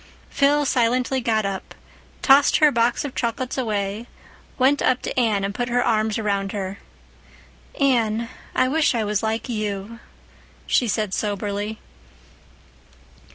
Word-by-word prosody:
Phil 290 +1 +3
silently 250 +1 +1
got 220 -3 +1
up, 195 -1 -5 0.5
tossed 275 +1 +6
her 300 -1 +5
box 235 +4 +1
of 275 - -5
chocolates 245 +2 -2
away, 215 -2 -2 0.5
went 275 +2 +3
up 255 -1 +2
to - - -4
Anne, 220 -5 +1
and 200 0 -2
put 245 +3 -3
her 245 +1 +2
arms 215 -1 +1
about 200 -3 -1
her. 195 -1 -4 1.0
"Anne, 235 -5 +2 0.3
I 255 - +3
wish 295 -1 +2
I 225 - 0
was 210 -1 -1
like 220 +2 -2
you," 215 -1 -4 0.7
she 245 - +2
said 210 -2 -1
soberly. 205 +1 -3
230 Hz, 135 wpm, -22 LUFS, 205-255 Hz, 1.0 s, tossed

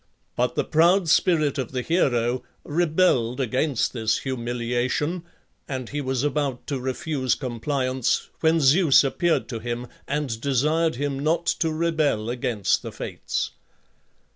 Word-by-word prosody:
But - - 0
the - - +1
proud 170 +2 +3
spirit 155 -4 +3
of 130 -1 -4
the 125 -1 -2
hero 125 -7 +1 0.2
rebelled 150 -7 +1
against 130 +1 0
this 110 -2 +1
humiliation, 125 +6 -2 0.5
and 130 -3 -4
he 145 0 -3
was 130 -1 -1
about 145 -3 -1
to 140 -3 -3
refuse 130 0 -1
compliance, 130 0 -1
when 160 0 +3
Zeus 150 +1 +5
appeared 165 +5 +1
to 115 -3 -4
him 120 +2 -4 0.2
and 140 -6 -2
desired 150 +5 +1
him 140 +1 -2
not 160 +4 0
to 165 -1 0
rebel 155 -9 0
against 120 -5 0
the - - -7
Fates. - - -4
135 Hz, 135 wpm, -24 LUFS, 125-155 Hz, 0.5 s, Zeus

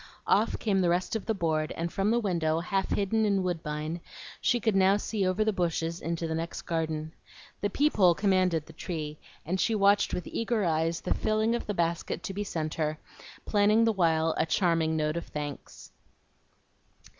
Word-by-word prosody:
Off 215 +3 +2
came 195 -4 +1
the 175 - +2
rest 180 +6 0
of 220 - -4
the 225 - +2
board, 160 -4 0
and 170 +1 -3
from 195 +1 +1
the 235 - +3
window, 165 -7 0
half 190 +3 -1
hidden 210 +2 +1
in 200 -3 +2
woodbine, 160 -1 -3 0.4
she 240 - +2
could 220 -2 +1
now 195 +1 +5
see 205 -2 -1
over 190 +4 +1
the 220 - +1
bushes 170 -2 -1
into 170 0 -2
the 160 - -2
next 165 +1 -4
garden. 160 -1 -2 0.5
The 205 - 0
peep 290 +6 +1
hole 180 -4 +6
commanded 185 -5 +2
the 160 - -13
tree, 155 -2 -5 0.3
and 185 +4 -1
she 225 - +2
watched 200 0 +4
with 180 - -3
eager 225 -3 -1
eyes 165 0 0
the - - 0
filling 215 +1 +1
of 235 - -3
the 205 - -2
basket 170 0 -1
to 195 - -4
be 205 +2 -2
sent 155 -6 -3
her, 155 -1 -1 0.5
planning 210 +2 +4
the 225 -1 +3
while 165 -4 +2
a - - +2
charming 165 -2 +1
note 155 +1 0
of 170 - -5
thanks. 145 -1 -7
175 Hz, 190 wpm, -28 LUFS, 160-205 Hz, 0.5 s, hole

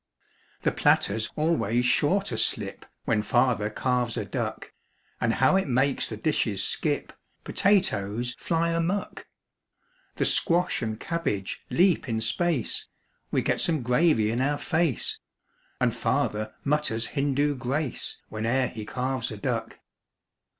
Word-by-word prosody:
The - - +3
platter's 110 +3 +2
always 135 -7 +1
sure 150 +10 +3
to 125 - -3
slip - - -1 0.2
When 110 -2 +2
Father 120 -1 +2
carves 125 +1 -1
a - - -2
duck. - - -4 0.5
And 115 -1 +1
how 135 +8 +4
it 190 - 0
makes 135 +2 +1
the 110 - -5
dishes 110 -6 0
skip! - - 0 0.3
Potatoes 120 - +1
fly 170 0 0
amuck! 170 +4 -2 0.9
The - - 0
squash 175 +1 +2
and 110 -1 -3
cabbage 145 - -3
leap 175 -6 +3
in 110 -1 0
space 135 +4 -1 0.4
We - - 0
get - - +1
some 160 -6 +1
gravy 125 -3 +3
in 120 +2 -1
our 145 +2 +1
face 165 - 0 0.6
And - - +2
Father 110 +1 -1
mutters 140 -6 +1
Hindu 145 0 +1
grace 135 +2 -2
Whene'er 115 +4 0
he 110 -1 -7
carves 130 0 -2
a 110 - -6
duck. 115 0 -3
125 Hz, 130 wpm, -26 LUFS, 115-155 Hz, 0.9 s, how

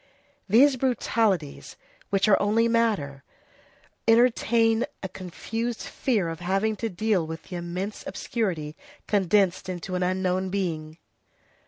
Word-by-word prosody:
These 260 +6 +6
brutalities, 225 - 0 0.3
which 195 0 +2
are 205 - +5
only 220 +3 +3
matter, 210 -13 0 0.8
entertain 230 0 +3 0.2
a - - -1
confused 225 +6 -5
fear 220 -10 -1
of 165 -1 -5
having 195 +5 0
to 225 - -2
deal 200 -3 0
with 160 0 -7
the 180 - -7
immense 180 +4 -5
obscurity 185 -8 -3 0.3
condensed 190 -2 +2
into 185 +1 -5
an 180 - -1
unknown 185 +1 0
being. 165 -5 -3
195 Hz, 120 wpm, -26 LUFS, 175-225 Hz, 0.8 s, These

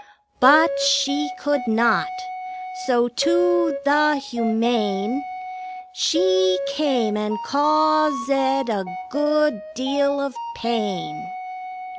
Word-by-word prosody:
But 285 +4 +6
she 280 +3 +1
could 290 -6 -1
not. 230 +8 +2 0.8
So 240 -1 +2
to 180 -2 +1
the 300 +1 +3
Humane 235 - -1 0.7
She 185 - +2 0.2
came, 260 -7 0
and 210 +1 -2
caus 300 0 +2
ed 270 -1 0
a 205 -3 -1 0.3
good 295 -3 +1
deal 280 +2 0
of 280 0 -3 0.2
pain. 235 - -4
270 Hz, 90 wpm, -21 LUFS, 225-290 Hz, 0.8 s, But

